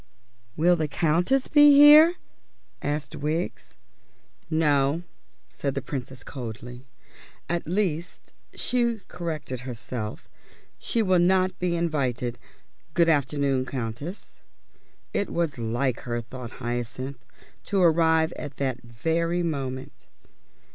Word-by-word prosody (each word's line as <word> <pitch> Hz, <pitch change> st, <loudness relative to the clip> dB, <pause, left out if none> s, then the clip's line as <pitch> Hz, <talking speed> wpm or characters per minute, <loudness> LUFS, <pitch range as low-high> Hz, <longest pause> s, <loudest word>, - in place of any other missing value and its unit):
"Will 175 Hz, +3 st, +4 dB
the 155 Hz, -2 st, -1 dB
Countess 175 Hz, -, +1 dB
be 295 Hz, -1 st, +7 dB
here?" 305 Hz, +4 st, +9 dB, 0.7 s
asked 145 Hz, 0 st, -3 dB
Wiggs. 155 Hz, +4 st, -3 dB, 0.7 s
"No," 150 Hz, 0 st, +2 dB, 0.4 s
said 140 Hz, -2 st, -4 dB
the -, -, -1 dB
Princess 130 Hz, -1 st, -6 dB
coldly. 125 Hz, 0 st, -8 dB, 0.6 s
"At 170 Hz, -2 st, -2 dB
least," 175 Hz, -2 st, -2 dB, 0.2 s
she 235 Hz, -3 st, 0 dB
corrected 155 Hz, -7 st, -5 dB
herself, 120 Hz, -3 st, -6 dB, 0.5 s
"she 230 Hz, -, 0 dB
will 185 Hz, -3 st, +3 dB
not 185 Hz, +1 st, +2 dB
be 180 Hz, -1 st, 0 dB
invited. 130 Hz, -8 st, -1 dB, 0.6 s
Good 170 Hz, -1 st, +4 dB
afternoon, 140 Hz, -3 st, +1 dB
Countess." 130 Hz, -, -6 dB, 0.7 s
It 200 Hz, -, 0 dB
was 165 Hz, -7 st, -1 dB
like 120 Hz, +3 st, -1 dB
her, 120 Hz, -1 st, -3 dB
thought 120 Hz, 0 st, -8 dB
Hyacinth, 120 Hz, +2 st, -4 dB, 0.4 s
to 200 Hz, -, 0 dB
arrive 160 Hz, -1 st, +4 dB
at 140 Hz, -2 st, -7 dB
that 130 Hz, -3 st, -2 dB
very 165 Hz, +9 st, -1 dB
moment. 135 Hz, -5 st, -4 dB
150 Hz, 105 wpm, -26 LUFS, 130-175 Hz, 0.7 s, here